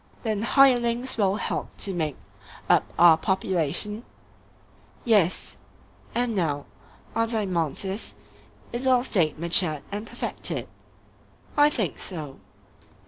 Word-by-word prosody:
Then 215 Hz, -3 st, -1 dB
hirelings 245 Hz, 0 st, +3 dB
will 200 Hz, -3 st, +1 dB
help 215 Hz, -, -4 dB
to 195 Hz, -, +1 dB
make 155 Hz, -5 st, -2 dB, 0.5 s
up -, -, +2 dB
our 165 Hz, -2 st, +7 dB
population? 190 Hz, +3 st, 0 dB, 1.0 s
Yes. 205 Hz, -7 st, +2 dB, 0.6 s
And 240 Hz, -1 st, 0 dB
now, 155 Hz, -7 st, -1 dB, 0.5 s
Adeimantus, 195 Hz, -, -2 dB, 0.6 s
is 245 Hz, +3 st, -3 dB
our 250 Hz, -1 st, +4 dB
State 175 Hz, -, +1 dB
matured 165 Hz, -2 st, +2 dB
and 210 Hz, +2 st, -5 dB
perfected? -, -, -2 dB, 0.9 s
I 295 Hz, 0 st, +5 dB
think 215 Hz, -, -3 dB
so. 150 Hz, -7 st, -7 dB
200 Hz, 100 wpm, -25 LUFS, 170-235 Hz, 1.0 s, our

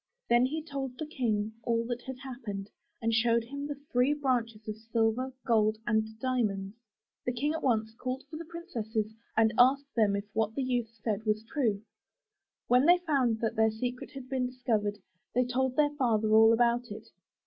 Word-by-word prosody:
'' -, -, -52 dB
Then 240 Hz, +1 st, +5 dB
he 310 Hz, +3 st, -3 dB
told 270 Hz, -4 st, -5 dB
the 310 Hz, -, -3 dB
King 220 Hz, -7 st, -1 dB
all 230 Hz, 0 st, 0 dB
that 245 Hz, 0 st, -3 dB
had 260 Hz, -1 st, -5 dB
happened, 215 Hz, -7 st, -6 dB, 0.3 s
and 230 Hz, 0 st, +1 dB
showed 230 Hz, +1 st, +3 dB
him 280 Hz, +4 st, -6 dB
the 290 Hz, -, -4 dB, 0.2 s
three 250 Hz, +4 st, +3 dB
branches 235 Hz, -6 st, -1 dB
of 215 Hz, -, -3 dB
silver, 225 Hz, +3 st, 0 dB
gold 215 Hz, -2 st, +3 dB
and 220 Hz, -1 st, 0 dB
diamonds. 215 Hz, -6 st, -1 dB, 0.5 s
The 250 Hz, -, 0 dB
King 290 Hz, +5 st, 0 dB
at 320 Hz, -, -3 dB
once 220 Hz, -4 st, +1 dB
called 255 Hz, +3 st, -4 dB
for 310 Hz, +2 st, -7 dB
the 335 Hz, -, -7 dB
princesses 225 Hz, -, -4 dB, 0.2 s
and 225 Hz, 0 st, +4 dB
asked 275 Hz, +3 st, +4 dB
them 210 Hz, -4 st, +3 dB
if 200 Hz, +1 st, -3 dB
what 220 Hz, 0 st, 0 dB
the 275 Hz, -, 0 dB
youth 245 Hz, -3 st, 0 dB
said 215 Hz, -2 st, -1 dB
was 215 Hz, 0 st, +1 dB
true. 225 Hz, -5 st, -1 dB, 0.8 s
When 250 Hz, +4 st, +5 dB
they 350 Hz, +1 st, +8 dB
found 275 Hz, -10 st, +1 dB
that 225 Hz, -, 0 dB
their 220 Hz, 0 st, +4 dB
secret 245 Hz, +3 st, -4 dB
had 270 Hz, -2 st, -8 dB
been 255 Hz, -1 st, 0 dB
discovered, 225 Hz, -5 st, -1 dB, 0.4 s
they 250 Hz, 0 st, +3 dB
told 255 Hz, +1 st, 0 dB
their 295 Hz, 0 st, +3 dB
father 225 Hz, -6 st, +1 dB
all 225 Hz, +1 st, +8 dB
about 240 Hz, +1 st, +3 dB
it. -, -, -9 dB
240 Hz, 190 wpm, -30 LUFS, 220-265 Hz, 0.8 s, they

